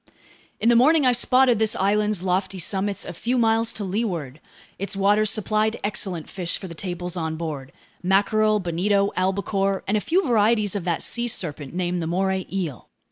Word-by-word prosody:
In - - 0
the 240 - +5
morning 290 +5 +5
I 250 - +6
spotted 250 -1 +3
this 220 -1 +1
island's 205 0 +1
lofty 190 +1 -1
summits 195 +2 -1
a - - -6
few 240 +9 -1
miles 225 -1 +2
to 210 - -5
leeward. 180 - -3 0.4
Its 200 +1 -3
waters 205 +2 +3
supplied 215 +1 0
excellent 190 -5 -2
fish 175 -3 -3
for 190 - -8
the 170 - -8
tables 175 +1 -5
on 160 -2 -3
board: 150 -5 -5 0.3
mackerel, 210 +3 +2
bonito, 200 +3 +1
albacore, 195 +1 0
and 200 - +1
a 210 - +1
few 365 - +1
varieties 215 -3 +2
of 195 -4 -3
that 170 -2 0
sea 240 0 0
serpent 155 - -4
named 180 -1 -1
the 160 - -3
moray 190 +2 -1
eel. 175 -9 -4
195 Hz, 180 wpm, -23 LUFS, 180-215 Hz, 0.4 s, I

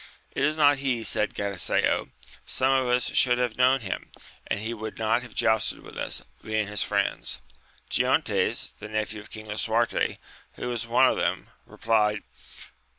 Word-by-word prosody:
It - - -3
is 150 +2 +2
not 145 -2 +5
he, 125 -4 0
said 105 -1 0
Galiseo, 100 -3 0 0.3
some 130 +1 +1
of 130 -1 +2
us 125 0 +1
should 125 -1 +5
have 125 -2 0
known 130 +1 +4
him, 95 -4 -5 0.4
and - - -1
he 110 +2 -3
would 110 -3 -6
not 110 +2 +1
have 125 -2 -11
jousted 110 -1 +1
with - - -12
us, - - -4 0.2
being 110 -1 0
his 105 0 -2
friends. - - -1 0.5
Giontes, - - +1
the 105 - -8
nephew 110 0 -2
of 105 - -15
King 110 0 -9
Lisuarte 110 +2 0 0.4
who 125 - -5
was 120 -3 -3
one - - +5
of - - +1
them, - - -1 0.2
replied. 105 -2 +1
110 Hz, 165 wpm, -26 LUFS, 105-125 Hz, 0.5 s, not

